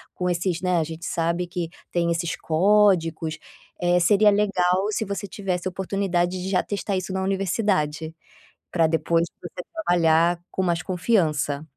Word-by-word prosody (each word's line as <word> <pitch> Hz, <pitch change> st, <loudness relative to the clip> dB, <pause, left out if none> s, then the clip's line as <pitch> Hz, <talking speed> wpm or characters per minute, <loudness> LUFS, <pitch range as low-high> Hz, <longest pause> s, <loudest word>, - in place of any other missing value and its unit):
com 180 Hz, -, -2 dB
esses, 175 Hz, 0 st, -1 dB
né, 180 Hz, -1 st, +2 dB
a -, -, +1 dB
gente 165 Hz, +2 st, -7 dB
sabe 170 Hz, +1 st, -1 dB
que 175 Hz, -2 st, -4 dB, 0.2 s
tem 170 Hz, -1 st, +1 dB
esses 170 Hz, 0 st, -1 dB
códigos, 165 Hz, -3 st, +2 dB, 0.4 s
eh, 175 Hz, 0 st, +3 dB
seria 205 Hz, +4 st, +5 dB
legal 195 Hz, -2 st, +2 dB
se 220 Hz, -, -1 dB
você 200 Hz, 0 st, -4 dB
tivesse 185 Hz, -2 st, -3 dB
oportunidade 185 Hz, -1 st, -1 dB
de 190 Hz, -, -3 dB
já 185 Hz, -2 st, +2 dB
testar 200 Hz, -1 st, -2 dB
isso 185 Hz, 0 st, -4 dB
na 190 Hz, -, -1 dB
universidade, 185 Hz, -5 st, -1 dB, 0.6 s
pra 165 Hz, -2 st, +3 dB
depois 165 Hz, +1 st, +1 dB
você 175 Hz, +1 st, -8 dB
trabalhar 170 Hz, -, +3 dB
com 190 Hz, -, -1 dB
mais 175 Hz, -2 st, 0 dB
confiança. 160 Hz, -7 st, 0 dB
180 Hz, 155 wpm, -24 LUFS, 165-195 Hz, 0.6 s, seria